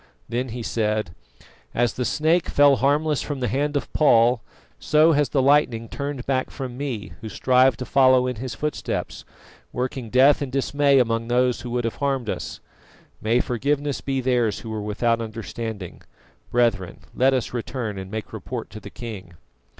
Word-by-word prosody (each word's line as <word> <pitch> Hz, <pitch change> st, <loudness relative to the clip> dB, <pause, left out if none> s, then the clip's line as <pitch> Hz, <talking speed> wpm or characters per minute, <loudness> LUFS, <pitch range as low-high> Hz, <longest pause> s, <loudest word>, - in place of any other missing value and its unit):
Then 125 Hz, +2 st, -2 dB
he 120 Hz, +1 st, -5 dB
said: 105 Hz, -5 st, -1 dB, 0.6 s
"As 120 Hz, 0 st, +2 dB
the 125 Hz, -, -2 dB
snake 160 Hz, +5 st, +2 dB
fell 145 Hz, -1 st, +5 dB
harmless 145 Hz, +3 st, +1 dB
from 145 Hz, -3 st, -4 dB
the 125 Hz, -, -1 dB
hand 145 Hz, +3 st, 0 dB
of -, -, -5 dB
Paul, 120 Hz, -5 st, +4 dB, 0.4 s
so 155 Hz, +2 st, +4 dB
has 145 Hz, -2 st, +2 dB
the 135 Hz, -3 st, +1 dB
lightning 130 Hz, -5 st, +3 dB
turned 140 Hz, -1 st, -5 dB
back 130 Hz, -1 st, 0 dB
from 130 Hz, -3 st, -6 dB
me, 130 Hz, -6 st, -4 dB
who 110 Hz, -, -6 dB
strive 130 Hz, +3 st, +3 dB
to 125 Hz, -, -5 dB
follow 130 Hz, 0 st, +4 dB
in 125 Hz, -2 st, -3 dB
his 120 Hz, 0 st, -5 dB
footsteps, 150 Hz, +4 st, -4 dB, 0.5 s
working 125 Hz, -1 st, -3 dB
death 135 Hz, +5 st, +5 dB
and 140 Hz, -3 st, -3 dB
dismay 140 Hz, +1 st, +2 dB
among 115 Hz, -2 st, +1 dB
those 125 Hz, 0 st, +1 dB
who 125 Hz, -, -6 dB
would 120 Hz, 0 st, -1 dB
have 115 Hz, -, -3 dB
harmed 135 Hz, -5 st, -1 dB
us. -, -, -6 dB, 0.6 s
May 115 Hz, +3 st, +2 dB
forgiveness 140 Hz, +3 st, -1 dB
be 135 Hz, -1 st, -1 dB
theirs 120 Hz, -4 st, +1 dB
who 110 Hz, -, -7 dB
were 110 Hz, -1 st, -3 dB
without 115 Hz, +3 st, 0 dB
understanding. 110 Hz, -3 st, -6 dB, 0.5 s
Brethren, 115 Hz, -7 st, 0 dB
let 135 Hz, +1 st, +3 dB
us 125 Hz, -, -2 dB
return 115 Hz, -4 st, -4 dB
and 95 Hz, 0 st, -7 dB
make 110 Hz, 0 st, -6 dB
report -, -, -6 dB
to -, -, -8 dB
the -, -, -10 dB
king." 105 Hz, -7 st, -8 dB
125 Hz, 175 wpm, -23 LUFS, 115-140 Hz, 0.6 s, fell